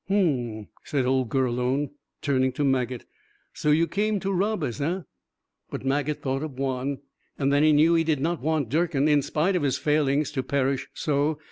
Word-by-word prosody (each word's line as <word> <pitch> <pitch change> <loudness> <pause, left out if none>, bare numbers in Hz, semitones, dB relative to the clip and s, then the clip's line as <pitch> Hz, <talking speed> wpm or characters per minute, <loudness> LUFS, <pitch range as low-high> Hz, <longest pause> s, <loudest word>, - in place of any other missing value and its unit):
"H'm," 125 - 0 0.2
said 140 -4 -1
old 130 -2 +1
Gurlone, 130 +2 0 0.3
turning 130 -3 +2
to 145 - -1
Maget. 130 -3 0 0.5
"So 150 - -1
you 155 +3 +4
came 205 +4 0
to 195 0 -1
rob 200 0 0
us, 120 -2 -3
eh?" 175 +6 -1 0.7
But - - -6
Maget 145 +2 -1
thought 135 0 -1
of 155 -2 -5
Juan, 135 +1 -2 0.4
and 140 0 +1
then 145 - +4
he 155 0 +5
knew 155 +3 +5
he 165 -1 +3
did 155 -3 0
not 165 +1 -1
want 150 -4 0
Durkin, 155 -1 +1
in 150 -1 +4
spite 165 +7 0
of 180 - +1
his 140 -2 +1
failings, 150 -1 +1
to 140 -3 -1
perish 135 0 -1
so. 150 +1 0
145 Hz, 190 wpm, -26 LUFS, 130-155 Hz, 0.7 s, he